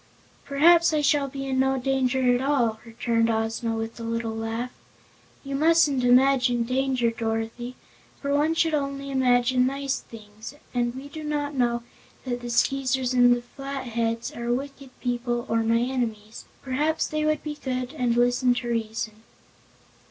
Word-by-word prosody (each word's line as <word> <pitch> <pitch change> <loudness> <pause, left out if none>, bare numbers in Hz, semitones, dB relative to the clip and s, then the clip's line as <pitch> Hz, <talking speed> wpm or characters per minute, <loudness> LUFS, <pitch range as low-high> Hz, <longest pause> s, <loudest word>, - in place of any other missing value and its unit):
"Perhaps 330 +4 +5
I 305 - +2
shall 290 -1 +2
be 275 0 -6
in 265 -1 -1
no 265 0 +2
danger 260 -1 +1
at 245 - -1
all," 250 -6 +1
returned 230 0 0
Ozma, 225 +1 -1
with 225 +1 -5
a - - -6
little 230 -1 -2
laugh. 225 +2 -3 0.7
"You 275 -1 -6
mustn't 300 -2 +3
imagine 250 -1 +4
danger, 255 -1 +1
Dorothy, 225 +2 -3 0.4
for 280 0 -2
one 300 +3 +2
should 325 -1 +2
only 275 -1 -2
imagine 250 -1 +3
nice 275 0 -2
things, 215 +3 -11 0.2
and 240 -1 0
we 270 +2 -7
do 310 +2 -8
not 295 -1 -2
know 240 -3 0 0.4
that 245 -1 -3
the 240 - -6
Skeezers 260 +1 +1
and 245 -1 +4
Flatheads 235 -4 -3
are 235 0 -3
wicked 275 +1 -4
people 240 -1 -1
or 225 0 +1
my 225 +1 +2
enemies. 230 -4 -3 0.2
Perhaps 295 +4 0
they 305 0 -2
would 305 -1 0
be 300 - -4
good 255 -1 -3
and 245 -2 0
listen 245 +1 +3
to 240 0 -3
reason." 220 -1 -3
250 Hz, 155 wpm, -25 LUFS, 235-275 Hz, 0.7 s, Perhaps